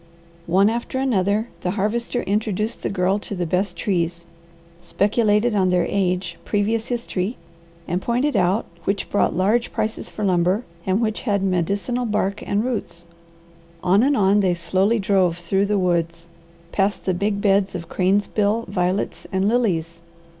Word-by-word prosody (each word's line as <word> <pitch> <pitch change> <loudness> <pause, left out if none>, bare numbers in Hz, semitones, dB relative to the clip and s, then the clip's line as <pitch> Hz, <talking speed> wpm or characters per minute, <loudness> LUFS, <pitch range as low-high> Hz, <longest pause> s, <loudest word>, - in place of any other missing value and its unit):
One 190 +4 +4
after 235 +3 -2
another 220 -3 +1
the 180 - -2
Harvester 235 +4 -1
introduced 210 +1 -1
the - - -2
Girl 190 +1 +1
to 205 - -6
the 180 -1 -2
best 180 +1 -1
trees, 170 -2 -1 0.6
speculated 210 +4 +2
on 190 -3 +2
their 180 -1 +2
age, 180 -3 -1
previous 220 +2 0
history, 230 -3 -2 0.5
and 180 +2 -1
pointed 250 +7 0
out 185 +4 +2 0.2
which 195 0 -2
brought 205 - +2
large 215 +6 +1
prices 220 +1 -3
for 215 - -4
lumber 185 +4 +2 0.2
and 190 +4 +2
which 220 -1 -1
had 200 -5 0
medicinal 200 +7 0
bark 210 -1 -1
and 205 +3 0
roots. 175 -9 -4 0.8
On 190 +3 +4
and 275 +2 +3
on 200 +1 +4
they 185 -3 +2
slowly 190 +6 +1
drove 190 -4 +2
through 195 +3 0
the 205 0 +1
woods, 170 -2 0 0.4
past 200 +1 0
the 185 - +1
big 200 +3 -1
beds 195 -1 +2
of 170 -2 -5
cranesbill, 205 +4 +1
violets, 185 0 -1
and 190 0 +1
lilies. 170 -8 0
200 Hz, 155 wpm, -22 LUFS, 180-215 Hz, 0.8 s, One